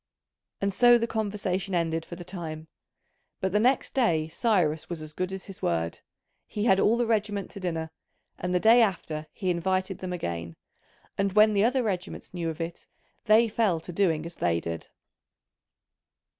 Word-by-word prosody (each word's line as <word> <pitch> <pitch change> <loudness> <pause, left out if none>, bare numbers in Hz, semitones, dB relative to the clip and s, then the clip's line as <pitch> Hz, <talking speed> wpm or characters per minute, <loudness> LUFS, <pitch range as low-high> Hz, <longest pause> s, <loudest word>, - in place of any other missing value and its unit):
And 200 0 0
so 240 +3 +6
the 230 - 0
conversation 200 -4 -2
ended 165 -1 0
for 175 - -8
the 175 - -8
time. 165 -4 -6 0.7
But 190 - -1
the 210 - +3
next 255 +5 +2
day 165 -12 +2
Cyrus 170 -5 +1
was 170 -2 -4
as 155 0 -8
good 185 +3 -2
as 190 -1 -6
his 195 -2 -11
word. 85 -1 -1 0.5
He 210 0 -3
had 190 -4 +5
all 225 +4 +4
the 240 - +1
regiment 210 -3 -1
to 200 - -8
dinner; 165 -3 -3 0.5
and 180 - -2
the 180 - +2
day 230 +5 +6
after 160 -7 -1
he 185 -3 -1
invited 185 +2 -1
them 185 -1 -5
again: 85 - -4 0.6
and 195 -1 +1
when 215 +1 +6
the 200 0 +3
other 250 +2 +2
regiments 190 -4 -4
knew 170 -2 -2
of 160 0 -6
it 165 +1 -6 0.4
they 220 +2 +6
fell 210 -6 +1
to 175 - -8
doing 165 -4 +1
as 170 - -7
they 85 - 0
did. 85 -1 -5
185 Hz, 180 wpm, -27 LUFS, 165-210 Hz, 0.7 s, so